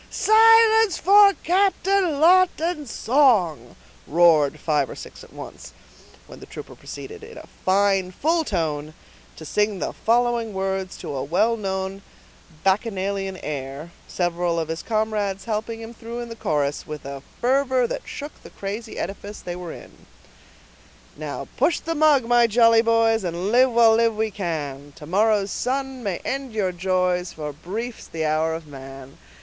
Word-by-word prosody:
"Silence, 445 -2 +5
for 400 0 +6
Captain 380 -3 +1
Lawton's 340 -3 +3
song!" 210 - +2 0.3
roared 160 -3 +4
five 150 -4 0
or - - -8
six - - -11
at - - -16
once; - - -10 0.5
when - - -13
the - - -12
trooper - - -10
proceeded, 440 0 -10
in 460 +2 -11
a - - -10 0.2
fine, 195 -1 +2
full 320 - 0
tone, 155 - -3 0.4
to 160 - -11
sing 210 +4 0
the - - -3
following 235 -2 0
words 190 0 -3
to - - -6
a 130 -1 -3
well 215 +10 +1
known 190 -2 -4 0.6
bacchanalian 195 -1 -1
air, 140 +2 -6 0.2
several 175 -1 -1
of 160 -1 -3
his 160 0 -3
comrades 210 -3 -2
helping 225 +1 -3
him 225 +1 -9
through 235 +1 -7
the 230 -1 -9
chorus 145 -7 -2
with 150 -2 -7
a 140 0 -7 0.2
fervor 260 0 +2
that - - -4
shook 290 +1 -7
the - - -12
crazy 210 +3 -6
edifice 200 +3 -6
they 175 - -6
were 175 -2 -7
in:— - - -14 1.1
Now - - -6
push 340 - +2
the 330 - -3
mug, 300 -5 +4
my 240 0 +4
jolly 230 0 +5
boys, 230 -1 +2
And 175 +3 -3
live, 255 +2 +5
while 230 -1 +5
live 230 0 +2
we 220 0 -1
can; 145 -7 -5
To 150 - -11
morrow's 205 +3 +1
sun 265 0 -3
may 195 -6 -2
end 270 -3 -3
your 200 -4 0
joys, 180 0 -1
For 150 -2 -6
brief's 215 - -6
the 160 -1 -3
hour 155 +1 0
of 165 -1 -8
man. 135 -1 -11
205 Hz, 155 wpm, -23 LUFS, 170-245 Hz, 1.1 s, for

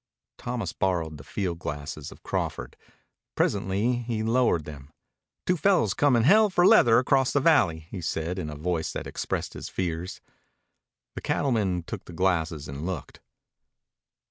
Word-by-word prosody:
Thomas 120 -6 -3
borrowed 85 -5 -1
the 70 - -11
field 90 -2 -3
glasses 75 -1 -6
of - - -15
Crawford. - - -3 0.6
Presently 100 +5 +1
he 115 -2 -3
lowered 115 -8 +2
them. 70 -1 -10 0.5
"Two 180 - +2
fellows 165 - +2
comin' 130 -6 +3
hell 210 - +6
for 180 -2 +3
leather 115 -9 +7
across 130 +1 +3
the 145 - +2
valley," 95 - +3
he 95 - -5
said 80 +3 -2
in 80 -4 -4
a 75 - -6
voice 80 +2 -2
that - - -5
expressed - - -3
his - - -7
fears. 90 0 -3 0.9
The - - -6
cattleman 105 - 0
took - - -7
the 85 - -11
glasses 80 -4 0
and 70 +2 -6
looked. 90 -4 -5
95 Hz, 150 wpm, -26 LUFS, 80-120 Hz, 0.9 s, leather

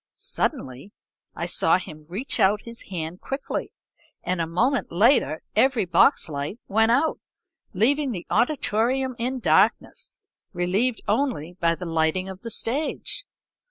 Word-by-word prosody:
Suddenly 130 +11 -3 0.4
I - - -3
saw - - +3
him 155 -4 -10
reach 220 +10 -1
out 205 +2 +4
his 230 -3 -11
hand 170 -1 -5
quickly, 270 +1 -4 0.5
and 180 -1 -1
a 165 - -1
moment 240 - 0
later 200 - +3
every 245 -1 +3
box 180 - +4
light 145 +5 -4
went 225 +3 +3
out, 285 +6 +2 0.6
leaving 275 +8 +2
the 180 -6 -5
auditorium 250 +1 +1
in 255 +3 -1
darkness, 190 +3 +1 0.3
relieved 195 +7 +1
only 210 - -1
by 170 -2 +2
the 180 - -7
lighting 165 +3 0
of 190 0 -9
the 230 - -6
stage. 270 - -2
205 Hz, 135 wpm, -24 LUFS, 170-250 Hz, 0.6 s, out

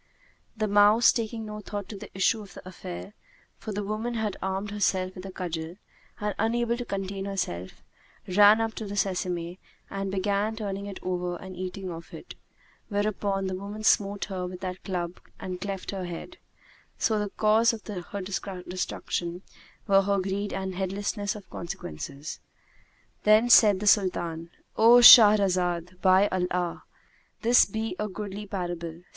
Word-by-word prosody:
The 215 0 0
mouse, 205 +3 +6
taking 225 -1 -3
no 210 0 -6
thought 205 -2 -6
to 215 - -7
the 195 - -9
issue 195 +3 +2
of 200 - -13
the - - -11
affair 185 +2 -8 0.5
(for 220 - -6
the 205 0 -3
woman 215 +4 -3
had 215 -3 -2
armed 190 +2 -3
herself 190 -2 0
with 185 +1 -8
a - - -7
cudgel), 170 -2 -5 0.4
and 210 0 -2
unable 235 +2 +1
to 245 - -5
contain 195 -1 -4
herself, 135 - -4 0.4
ran 205 +3 +6
up 225 0 -1
to 220 - -4
the 200 - -5
sesame 180 -2 -2 0.3
and 195 0 -3
began 200 +3 0
turning 200 -2 -4
it 200 - -7
over 180 -1 -2
and 185 +1 -9
eating 185 +1 -5
of 165 0 -9
it; - - -10 0.6
whereupon 205 -2 -1
the 190 - -2
woman 200 +3 -6
smote 200 -1 +2
her 185 -2 -4
with 180 0 -9
that 185 -1 -5
club 175 -2 -4 0.2
and 180 -1 -6
cleft 195 -1 -4
her 190 -2 -4
head: 175 - -8 0.6
so 220 -2 +1
the 205 -1 -2
cause 220 +3 +3
of 225 -2 -8
her 200 0 -6
destruction 185 -2 -4 0.4
were 195 -1 +5
her 200 +1 +1
greed 195 +2 -2
and 190 -1 -4
heedlessness 200 +2 -2
of 200 -3 -11
consequences. 145 - -7 0.8
Then 215 +3 +4
said 205 -5 +7
the 210 - -4
Sultan, 170 -5 +1 0.3
"O 230 +2 +7
Shahrazad, 185 -6 +7
by 190 +1 +5
Allah! 180 -1 -2 0.6
this 240 +2 +6
be 220 0 -4
a 210 - -1
goodly 205 +1 -6
parable! 175 -3 -5
195 Hz, 160 wpm, -27 LUFS, 185-210 Hz, 0.8 s, said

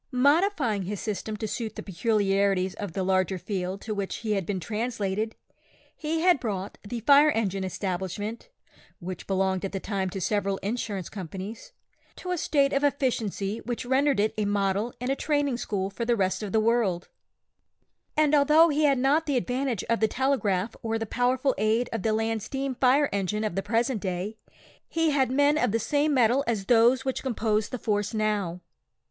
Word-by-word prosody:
Modifying 280 - +2
his 205 +1 -4
system 215 0 -4
to 220 - -3
suit 220 +1 -4
the - - -6
peculiarities 195 -2 +1
of 205 -5 -6
the 190 - -1
larger 185 0 +1
field 190 0 -4
to 220 - -4
which 200 -2 -3
he 220 -2 -4
had 195 -4 -1
been 195 -2 -1
translated, 215 +1 -2 0.6
he 320 +1 -2
had 350 -4 +4
brought 200 -5 -4
the 230 +3 -6
"Fire 285 +5 +6
Engine 195 -7 -1
Establishment," 190 - -4 0.5
(which 180 -1 -7
belonged 190 -1 0
at 195 - -4
that 195 - -4
time 195 -2 -2
to 195 +2 -5
several 200 +1 0
insurance 205 -3 -3
companies) 195 - -7 0.4
to 365 - -6
a 360 - 0
state 280 -2 +2
of 275 - +1
efficiency 230 -7 0
which 240 0 -4
rendered 270 0 +2
it 215 +1 +2
a 210 - +1
model 200 +2 0
and 250 +2 -1
a - - +1
training 290 -4 0
school 195 -4 -2
for 235 - -4
the 235 0 +2
rest 190 -2 0
of 210 -2 -4
the 220 - +3
world; 215 -6 +1 1.1
and 305 -1 +3
although 300 +3 +6
he 300 0 +2
had 280 -2 +4
not 285 +5 +2
the 280 -3 +1
advantage 250 -3 -1
of 230 0 0
the 220 - +3
telegraph 235 -7 0
or 225 0 -1
the 225 - -3
powerful 250 +4 +1
aid 220 +3 +2
of 225 - -2
the 220 - +1
land 225 0 0
steam 270 +4 -3
fire 265 +3 +3
engine 200 +2 -1
of 215 - -1
the 195 - 0
present 230 +2 0
day, 185 +3 -3 0.5
he 325 -1 +1
had 270 -3 +2
men 285 +3 +3
of 250 -6 +2
the 225 - +2
same 290 +6 +1
metal 255 0 +3
as 215 -5 -1
those 240 +4 +4
which 265 - -1
compose 220 -4 0
the 255 - -4
force 210 -1 -1
now. 205 -5 -1
220 Hz, 190 wpm, -27 LUFS, 195-260 Hz, 1.1 s, Fire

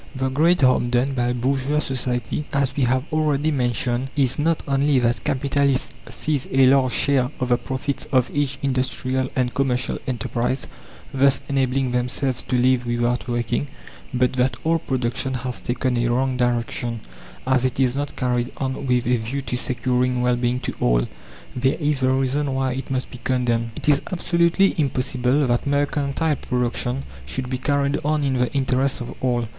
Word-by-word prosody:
The 130 0 -1
great 160 +6 +3
harm 130 -2 +4
done 125 +3 +1
by 120 -1 0
bourgeois 135 +4 0
society, 130 0 -1
as 140 -1 0
we 135 - +2
have 130 +1 +1
already 155 -1 +1
mentioned, 125 -1 0
is 135 -2 +1
not 165 +2 +1
only 140 0 +2
that 120 -3 +1
capitalists 140 0 0 0.2
seize 150 -4 -2
a 135 0 +4
large 130 -1 +4
share 130 -2 +2
of 125 -1 -1
the 120 - +4
profits 130 +2 -3
of 130 -2 +2
each 145 -1 0
industrial 130 -1 -1
and 125 -2 0
commercial 130 -2 0
enterprise, 125 +1 -1 0.5
thus 135 0 +4
enabling 135 -1 0
themselves 125 +1 -1
to 125 - -1
live 125 0 +2
without 120 +1 0
working, 120 +3 -1 0.4
but 125 0 +1
that 130 +1 +1
all 165 +1 +2
production 130 -2 -2
has 125 0 -4
taken 125 +1 -1
a 120 0 +1
wrong 130 +2 +1
direction, 120 -1 -1 0.4
as 130 -1 +2
it 130 0 -1
is 130 -1 +2
not 145 +1 -3
carried 125 -1 -1
on 135 0 -3
with 125 -1 +2
a 125 +1 +2
view 125 +5 -4
to 125 - -3
securing 125 0 0
well 125 0 +3
being 120 +1 0
to - - -3
all. - - +2 0.5
There 130 +2 +1
is 150 -3 +1
the 130 -1 +2
reason 135 +1 0
why 130 -1 0
it 135 +1 -5
must 130 -1 -2
be 125 - -9
condemned. 120 -3 0
It - - -7
is 145 -1 +4
absolutely 170 +2 +2
impossible 130 0 +1
that 120 +2 0
mercantile 145 +1 0
production 125 +1 -1 0.2
should 125 - -3
be 130 - -2
carried 140 +1 +1
on 150 0 +1
in 135 -2 0
the 125 - +1
interest 135 0 +1
of 120 - -6
all. 120 -2 +1
130 Hz, 175 wpm, -22 LUFS, 125-140 Hz, 0.5 s, harm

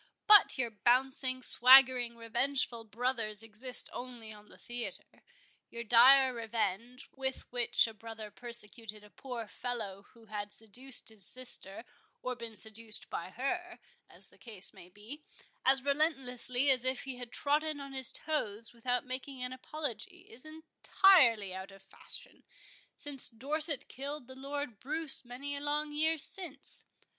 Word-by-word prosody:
But 415 -7 +6
your 240 -3 -2
bouncing, 255 +3 0
swaggering, 250 -2 +8
revengeful 235 0 0
brothers 225 -1 -2
exist 225 +4 +2
only 240 -3 -9
on 210 0 -17
the - - -17
theatre. 240 0 -8 0.5
Your 235 0 -7
dire 255 +3 +6
revenge, 230 +1 -4
with 265 -1 -4
which 245 -1 +1
a 225 - -7
brother 220 -1 -10
persecuted 215 -1 -3
a 210 - -18
poor 245 -4 -8
fellow 205 -5 -7
who 230 -1 -19
had 205 -1 -7
seduced 245 +5 -5
his 220 -3 -10
sister, 235 -2 -2 0.4
or 255 0 -3
been 230 -2 -9
seduced 220 +1 -3
by 170 - -5
her, 350 - -4 0.3
as - - -16
the - - -24
case 210 -6 -6
might 180 +2 -16
be, 230 +9 -10 0.4
as 265 0 +3
relentlessly 270 -3 +2
as 255 -2 +3
if 260 0 -2
he 265 -2 -7
had 245 -1 -7
trodden 300 +1 -1
on 275 -1 -9
his 265 -2 +5
toes 230 -8 -2
without 245 +3 -2
making 255 +1 -6
an 250 0 -5
apology, 305 - -6
is 405 -4 -13
entirely 310 - +3
out 190 +1 -8
of 195 0 -16
fashion, - - -10 0.5
since 285 -3 -1
Dorset 285 +5 -2
killed 280 +1 -7
the 260 - -13
Lord 275 -4 -6
Bruce 305 +1 -2
many 260 +4 -7
a 280 - -6
long 295 +1 -2
year 315 +2 +1
since. 335 0 -3
250 Hz, 150 wpm, -31 LUFS, 225-275 Hz, 0.5 s, swaggering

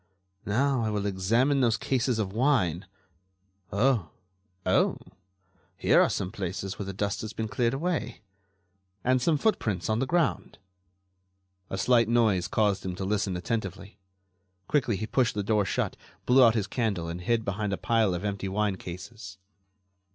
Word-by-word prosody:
Now, 130 +4 +1
I 110 - 0
will 105 -1 -2
examine 115 +9 +2
those 120 -2 +3
cases 125 -2 0
of 100 -3 -2
wine... 105 - +1 0.8
oh! 105 - +2 0.6
oh! 95 - +2 0.8
here - - +4
are - - +3
some 90 - -2
places 95 -2 -5
where 100 - -4
the - - -3
dust 100 +1 -2
has 110 - -6
been 110 - -3
cleared 120 +3 0
away... 145 -8 -2 0.8
and 130 0 +2
some 155 +3 +2
footprints 110 - 0
on 110 - +1
the 130 - 0
ground...." 170 -2 0 1.1
A 95 - -3
slight 115 +1 +3
noise 110 -7 +2
caused 105 0 +1
him 90 -1 -4
to 95 - -4
listen 100 -2 -1
attentively. 100 +1 -4 0.7
Quickly 130 -7 +1
he 110 - -3
pushed 120 0 +1
the 105 - -1
door 105 -1 +2
shut, - - -1 0.3
blew 130 +1 +6
out 115 -2 +5
his 105 -4 0
candle 100 -6 -2
and 85 +2 -5
hid 115 +4 0
behind 100 +1 -2
a 95 - -1
pile 110 -5 +1
of 90 +4 -5
empty 100 -1 -2
wine 100 0 0
cases. 95 +3 -9
105 Hz, 160 wpm, -27 LUFS, 95-120 Hz, 1.1 s, blew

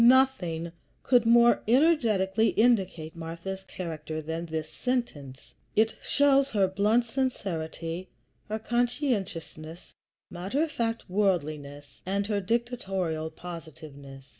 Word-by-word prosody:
Nothing 235 -11 +4 0.3
could 245 -3 +4
more 235 +1 +6
energetically 225 - +3
indicate 190 -9 +1
Martha's 170 +4 -6
character 160 -3 -5
than 160 +2 -4
this 160 -1 -3
sentence. 155 - -4 0.2
It 220 +1 +3
shows 275 -1 +3
her 200 -6 +2
blunt 210 +5 +2
sincerity, 185 -8 -3 0.4
her 215 - -1
conscientious, 240 - -1 0.8
matter 195 - -1
of 325 - -2
fact 230 -3 -2
worldliness, 155 -8 -2
and 200 +2 -1
her 205 -1 0
dictatorial 190 -8 -1
positiveness. 155 -5 -10
190 Hz, 105 wpm, -28 LUFS, 160-235 Hz, 0.8 s, more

